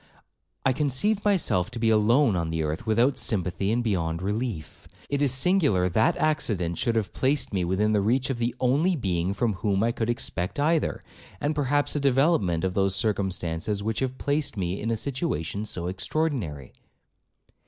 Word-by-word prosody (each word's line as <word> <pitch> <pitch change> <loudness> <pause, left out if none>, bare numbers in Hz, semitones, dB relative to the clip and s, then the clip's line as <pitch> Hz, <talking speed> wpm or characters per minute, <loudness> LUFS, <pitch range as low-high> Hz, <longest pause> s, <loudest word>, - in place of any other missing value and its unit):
I 135 - +4
conceived 150 - 0
myself 165 - +1
to 120 - -8
be 115 -1 +2
alone 110 +2 +4
on 85 -2 -1
the 80 -1 -1
earth, 80 +9 -4
without 120 +5 +2
sympathy 100 -3 -1
and 120 +2 +1
beyond 85 -7 -1
relief. 105 -6 -4 0.2
It 140 0 0
is 140 -3 +3
singular 135 - +2
that 110 +6 +2
accident 100 - 0
should 115 - 0
have 110 -3 -1
placed 135 -3 0
me 95 -2 0
within 95 +5 +1
the 105 -1 +2
reach 125 +6 +1
of 120 - -4
the 120 +1 -1
only 145 +9 +2
being 90 - -1
from 115 +1 0
whom 100 +1 0
I 115 - +2
could 115 0 -2
expect 115 -4 -2
either, 155 +2 +1 0.4
and 145 +2 0
perhaps 145 0 0
a - - +1
development 135 - +2
of 95 -1 0
those 95 0 +1
circumstances 95 -2 -1
which 110 0 -1
have 130 -1 -2
placed 145 -3 -1
me 90 0 -2
in 115 - -2
a 115 - +1
situation 110 - -2
so 85 -5 -2
extraordinary.' 95 - -2
110 Hz, 175 wpm, -26 LUFS, 95-135 Hz, 0.4 s, I